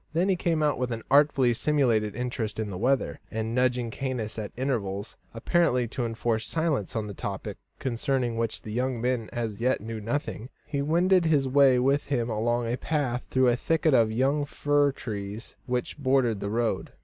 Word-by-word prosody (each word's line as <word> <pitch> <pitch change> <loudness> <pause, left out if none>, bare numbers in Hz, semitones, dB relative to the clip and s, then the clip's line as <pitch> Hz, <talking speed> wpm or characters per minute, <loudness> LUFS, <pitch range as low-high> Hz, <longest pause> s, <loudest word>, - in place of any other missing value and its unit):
Then 175 +4 +2
he 190 - +3
came 165 -3 0
out 145 -3 +1
with 125 -1 -1
an 115 -1 -4
artfully 140 -4 +5
simulated 115 -7 +1
interest 120 -3 -3
in 105 -2 -2
the 90 - -5
weather, 130 +4 +1
and, 110 0 -3
nudging 125 -1 +1
Caius 115 -4 -3
at 105 - -5
intervals, 105 -6 -2 0.2
apparently 125 0 +1
to 120 -1 -2
enforce 115 -1 -1
silence 160 - -1
on 110 -2 -2
a 100 - -6
topic 100 +1 -5 0.2
concerning 125 -1 -1
which 115 -1 -2
the 105 - -7
young 125 +2 -1
man 120 -2 -1
as 115 -3 -3
yet 130 +2 +2
knew 110 +1 -6
nothing, 120 +1 -3 0.2
he 145 -2 -2
wended 175 +4 +3
his 145 -4 +3
way 135 -1 +5
with 135 +3 +2
him 120 -4 -1
along 120 +2 0
a 120 +2 -1
path 130 -6 -1
through 130 -1 +3
a 120 - +3
thicket 160 +3 +1
of 115 -3 +4
young 135 +6 +1
fir 145 0 +1
trees 105 -3 -6
which 125 +3 -2
bordered 130 -6 +2
the 100 - -3
road. 115 +1 -1
125 Hz, 185 wpm, -27 LUFS, 115-140 Hz, 0.2 s, artfully